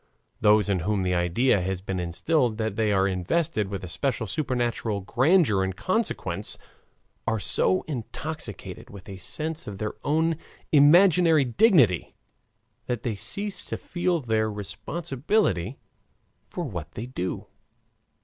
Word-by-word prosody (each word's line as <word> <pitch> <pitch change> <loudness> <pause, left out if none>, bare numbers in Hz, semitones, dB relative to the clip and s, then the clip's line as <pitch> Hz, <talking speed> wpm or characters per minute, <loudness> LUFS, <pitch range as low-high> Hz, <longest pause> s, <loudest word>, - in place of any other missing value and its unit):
Those 105 -1 +4
in 100 -2 +1
whom 100 +3 0
the 90 0 0
idea 90 +6 +2
has 95 0 -2
been 95 -1 -4
instilled 110 - 0
that 110 -3 -2
they 110 -1 +1
are 95 -1 +3
invested 100 - 0
with 100 -1 -5
a - - -5
special 115 - -1
supernatural 120 -5 -1
grandeur 130 - +3
and 95 0 -2
consequence, 220 - -2 0.7
are 110 -1 +1
so 95 0 +1
intoxicated 140 - -6
with 100 -2 -12
a 95 -2 -7
sense 160 - -3
of 100 -2 -6
their 105 +1 -3
own 160 +2 +1 0.3
imaginary 165 0 +6
dignity 130 - +3 0.7
that 120 -2 -2
they 115 - -1
cease 190 - -2
to - - -4
feel 175 -1 -1
their 110 -4 0
responsibility 120 - -1 0.7
for 175 - -4
what 90 - -6
they 115 - -5
do. 95 -8 -4
110 Hz, 135 wpm, -26 LUFS, 95-155 Hz, 0.7 s, imaginary